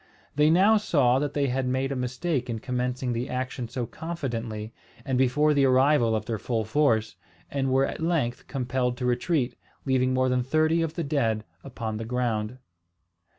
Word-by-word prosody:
They 150 +1 +4
now 195 +7 +5
saw 135 -11 +3
that 145 0 -2
they 145 -1 +2
had 130 +1 -1
made 130 +2 0
a - - -1
mistake 125 +2 -2
in 115 - -2
commencing 125 +1 -2
the 120 +3 -3
action 125 -1 -3
so 120 +1 -3
confidently, 120 -7 -5 0.3
and 135 -2 -1
before 130 +4 +3
the 140 -1 +3
arrival 130 -3 +4
of 110 -1 -2
their 110 -2 -3
full 115 -1 -1
force, 110 -5 +1 0.3
and 135 -1 0
were 135 +1 +3
at - - -5
length 160 -8 -1
compelled 125 -2 -1
to 125 - -3
retreat, 125 +2 0 0.3
leaving 130 -1 +2
more 130 0 +2
than 125 0 +1
thirty 155 +5 +2
of 165 -1 -2
the 170 - -2
dead 115 -8 0 0.2
upon 115 -5 -5
the 115 - -5
ground. 120 -1 -1
130 Hz, 180 wpm, -26 LUFS, 120-145 Hz, 0.3 s, now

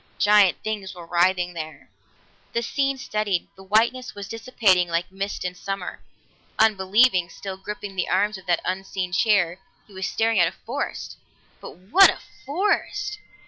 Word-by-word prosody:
Giant 205 -3 +5
things 205 -4 -4
were 175 -1 -10
writhing 180 +1 +1
there. 160 -2 -8 0.7
The 235 - 0
scene 275 +2 0
steadied; 210 -7 -2
the 190 - -14
whiteness 230 +6 +1
was 200 -1 -7
dissipating 220 -6 +2
like 170 +2 -2
mist 195 0 -4
in 180 - -2
summer. 195 0 -5 0.6
Unbelieving, 205 -2 +3
still 195 -1 -7
gripping 200 +1 -7
the 180 - -1
arms 205 +1 +1
of 190 - -19
that 175 -1 +2
unseen 185 0 -3
chair, 190 -3 +2 0.3
he 205 - -19
was 190 0 -3
staring 225 -2 +1
at 170 - +5
a - - -22
forest. - - -4 0.4
But - - -11
what 225 - +6
a - - -2 0.3
forest! 415 +5 -1
195 Hz, 155 wpm, -24 LUFS, 180-220 Hz, 0.7 s, what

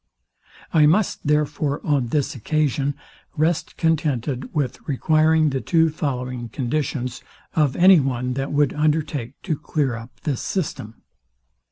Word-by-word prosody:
I 155 -3 +6
must, 180 -1 +1
therefore, 150 -1 +1
on 140 -5 +1
this 145 +3 0
occasion, 140 +2 0 0.4
rest 160 +2 0
contented 145 -5 0
with 140 -5 -2
requiring 155 +2 +3
the 135 -1 -2
two 160 +7 +3
following 125 -5 -3
conditions 130 0 -2 0.3
of 150 -5 +2
any 185 0 +7
one 125 -2 -1
that 135 +2 -3
would 145 -1 +2
undertake 150 -4 -1
to 160 - -1
clear 145 -3 -1
up 115 0 -11
this 140 -5 -2
system. 130 - -4
145 Hz, 130 wpm, -22 LUFS, 125-155 Hz, 0.4 s, any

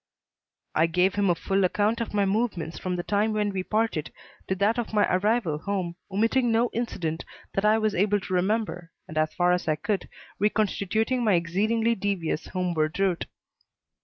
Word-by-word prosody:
I 160 +2 +3
gave 180 +3 +2
him 205 -2 +1
a 175 - +3
full 195 +3 0
account 210 +5 +1
of 230 - -3
my 205 -1 +2
movements 195 -5 -1
from 185 -1 -2
the 175 - -3
time 210 +3 +1
when 210 -1 0
we 190 -1 -2
parted 215 -5 -1 0.4
to 190 - 0
that 210 +5 +1
of 230 - -4
my 205 - +5
arrival 195 -5 +1
home, 185 -2 -3
omitting 230 +5 +2
no 230 +2 +2
incident 170 -9 -2 0.3
that 195 - 0
I 215 +1 +5
was 215 -1 +1
able 205 +3 +2
to 185 - -6
remember 185 -2 0 0.2
and, 155 - -9
as 155 0 +1
far 175 0 +3
as 180 -1 0
I 155 - +2
could, 195 +5 -2 0.3
reconstituting 215 +3 +1
my 215 -3 +3
exceedingly 215 +7 +1
devious 190 -7 -2
homeward 175 -3 -1
route. 190 -3 +1
200 Hz, 180 wpm, -26 LUFS, 180-215 Hz, 0.4 s, my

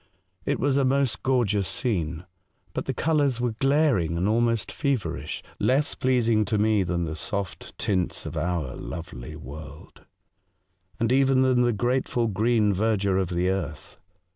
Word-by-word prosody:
It - - +1
was 140 0 +2
a 140 - +3
most 135 -1 +1
gorgeous 110 -7 +1
scene, 85 - -2 0.5
but - - -3
the - - -1
colours 145 -5 +1
were 120 -1 0
glaring 135 - +2
and 90 +3 +1
almost 115 0 +1
feverish 140 -7 -2
— - - -28
less 140 +3 +2
pleasing 115 -4 +2
to 105 +2 0
me 105 -1 +3
far 90 - -4
than 85 0 0
the 80 -1 -4
soft 100 +1 -5
tints 95 -3 -1
of - - -6
our 80 -5 -2
lovely 75 -4 -7
world, 75 0 -11 0.9
and 115 0 +1
even 135 0 +4
than 130 -1 +3
the 120 0 +3
grateful 120 +1 0
green 110 0 +2
verdure 100 -1 +1
of 90 - -2
the 90 +1 0
earth. 80 -6 -5
110 Hz, 160 wpm, -26 LUFS, 90-130 Hz, 0.9 s, even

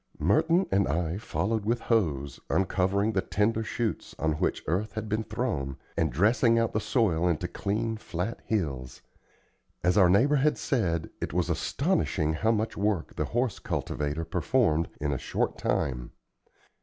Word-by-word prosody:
Merton 165 - +3
and 100 0 +3
I 85 +2 -1
followed 105 +3 -1
with 115 +3 0
hoes, 75 - 0
uncovering 95 +4 +1
the 95 - +2
tender 110 +3 0
shoots 110 0 -3
on 80 0 +1
which 75 - -1
earth 100 +7 -1
had 110 0 -4
been 110 +1 -1
thrown, 110 - -2 0.2
and 80 -3 +1
dressing 115 - +3
out 115 -1 +1
the 105 - +1
soil 95 -8 +1
into 85 -3 0
clean 110 +3 -2
flat 100 +1 -4
hills. 70 - -3 0.8
As 90 +3 +3
our 90 -2 +6
neighbor 130 +11 +4
had 150 +2 +2
said, 85 - -1
it - - -3
was 90 -1 +1
astonishing 95 - 0
how 110 +8 0
much 110 0 0
work 100 -4 -1
the - - -1
horse 120 -2 -1
cultivator 75 +2 -2
performed 85 -1 +1
in 75 0 -1
a 65 - -2
short - - -2
time. 60 -3 -1
100 Hz, 155 wpm, -28 LUFS, 80-110 Hz, 0.8 s, our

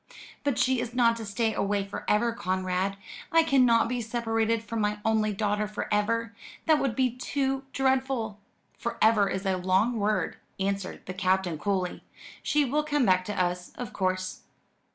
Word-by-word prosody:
"But 285 -4 0
she 260 -1 +2
is 240 +1 -5
not 235 -2 +4
to 225 - -6
stay 220 +2 0
away 200 -1 0
for 200 - -7
ever, 230 +2 +2
Conrad. 185 -1 -1 0.3
I 330 0 +6
cannot 250 -7 +4
be 245 0 -2
separated 225 -1 0
from 225 0 -3
my 210 0 0
only 220 -1 +2
daughter 210 0 0
for 210 - -4
ever. 230 +2 0 0.3
That 315 -2 +4
would 265 -5 0
be 255 -1 +2
too 270 +1 -1
dreadful." 265 -5 0 0.4
"'For 235 - -3
ever' 215 -3 +4
is 190 +1 -3
a 190 -1 +1
long 190 +6 +2
word," 205 -4 0 0.2
answered 195 -1 -2
the 185 - -5
Captain 185 -3 0
coolly. 185 -1 -1 0.4
"She 295 -1 +2
will 290 +4 +1
come 295 -3 +1
back 185 -2 +4
to 205 -1 -3
us 180 0 -1
of 245 -3 -6
course." 185 -1 -1
220 Hz, 175 wpm, -28 LUFS, 195-245 Hz, 0.4 s, I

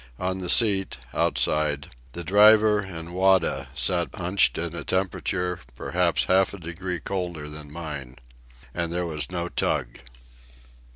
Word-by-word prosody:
On 95 +1 -2
the 90 -2 -4
seat, 100 -5 +4 0.2
outside, 75 -4 0 0.2
the 85 - -5
driver 105 +3 +6
and 85 -4 -7
Wada 95 -6 +2
sat 85 +6 0
hunched 90 +1 +2
in 85 0 -3
a - - -5
temperature 90 -1 -1 0.2
perhaps 85 +5 +1
half 95 +1 +2
a - - -11
degree 85 +2 -4
colder 85 -3 -4
than 75 -1 -8
mine. 75 -6 -7 0.6
And 85 -1 -2
there 90 +1 -1
was 75 -4 -3
no 90 -1 -3
tug. - - -2
85 Hz, 135 wpm, -25 LUFS, 80-95 Hz, 0.6 s, driver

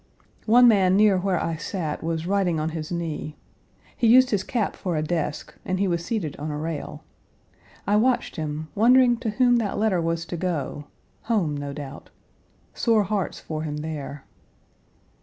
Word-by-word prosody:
One 245 +3 +7
man 195 -4 +4
near 205 -3 +5
where 185 -2 0
I 165 -1 -2
sat 160 -2 -4
was 165 0 -2
writing 185 -4 +1
on 155 +1 -1
his 160 0 -6
knee. 160 -3 -4 0.6
He 235 - +1
used 255 +3 +6
his 205 -3 +1
cap 230 -5 -2
for 175 -4 -3
a 155 - 0
desk 155 -2 -3
and 185 0 -2
he 200 - +2
was 170 -2 -1
seated 170 -6 -3
on 150 +2 -5
a 150 - -3
rail. 160 0 -5 0.8
I 205 +2 +3
watched 245 +3 +1
him, 155 0 -4
wondering 245 +2 +5
to 230 -1 -3
whom 245 +3 +3
that 220 -4 -1
letter 205 -4 +1
was 165 0 -1
to 175 - -5
go 155 -5 -3 0.4
home, 200 -10 0
no 145 0 -5
doubt. 140 -1 -8 0.6
Sore 225 -3 +2
hearts 200 -2 -2
for 155 -1 -5
him 150 -1 -4
there. 150 -2 -6
175 Hz, 175 wpm, -24 LUFS, 155-210 Hz, 0.8 s, One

